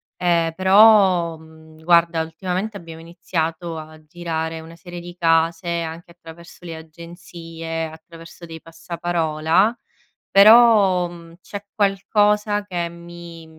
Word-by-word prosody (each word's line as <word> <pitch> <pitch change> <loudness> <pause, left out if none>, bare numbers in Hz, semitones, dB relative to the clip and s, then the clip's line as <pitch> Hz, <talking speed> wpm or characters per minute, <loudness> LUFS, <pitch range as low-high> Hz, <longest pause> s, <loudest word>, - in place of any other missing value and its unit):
ehm, 170 -2 0
però, 190 -3 +5
uhm, 160 0 -18
guarda, 170 -1 +3
ultimamente 185 +6 -4
abbiamo 165 -2 -11
iniziato 165 0 -4
a 155 0 -11
girare 160 0 -5
una 165 +1 -13
serie 175 +1 -10
di 175 +1 -11
case, 165 +1 +1
anche 165 +1 -8
attraverso 170 +1 -15
le 165 -2 -7
agenzie, 165 0 -8
attraverso 165 +1 -14
dei 160 -1 -10
passaparola, 170 +4 -1 0.5
però, 200 -4 +6
uhm, 170 -1 -14
c'è 205 0 -9
qualcosa 205 +1 +1
che 175 -3 -3
mi 170 -1 -12
170 Hz, 115 wpm, -20 LUFS, 165-180 Hz, 0.5 s, però